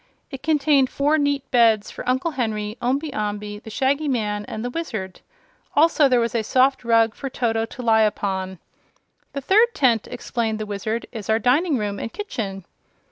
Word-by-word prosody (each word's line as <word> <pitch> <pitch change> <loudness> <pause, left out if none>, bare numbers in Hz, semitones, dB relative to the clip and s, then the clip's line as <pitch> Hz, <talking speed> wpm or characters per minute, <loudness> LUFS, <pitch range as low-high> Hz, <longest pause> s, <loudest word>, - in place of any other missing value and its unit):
It 270 -2 -7
contained 290 -4 +3
four 295 +3 +1
neat 285 -1 -1
beds 225 -4 +3
for - - -5
Uncle 260 +6 0
Henry, 215 -5 -2
Omby 275 +4 -1
Amby, 210 0 -4
the 220 - -11
Shaggy 275 +6 0
Man 210 -5 -1
and 220 +3 -6
the 245 - -3
Wizard. 220 - -5 0.5
Also 305 -1 +5
there 250 -1 +4
was 235 +1 -1
a 230 - +1
soft 260 +5 +2
rug 230 -1 +3
for 275 - -6
Toto 225 -3 -1
to 250 - -9
lie 220 -1 +4
upon. 190 -3 -1 0.8
"The 280 - -4
third 440 - +3
tent," 235 -6 +2
explained 235 -3 -2
the 215 - -4
Wizard, 210 +3 -3
"is 220 -3 -8
our 220 - +4
dining 275 - +2
room 205 -2 -3
and 230 - -5
kitchen." 200 - -5
235 Hz, 180 wpm, -22 LUFS, 215-275 Hz, 0.8 s, Also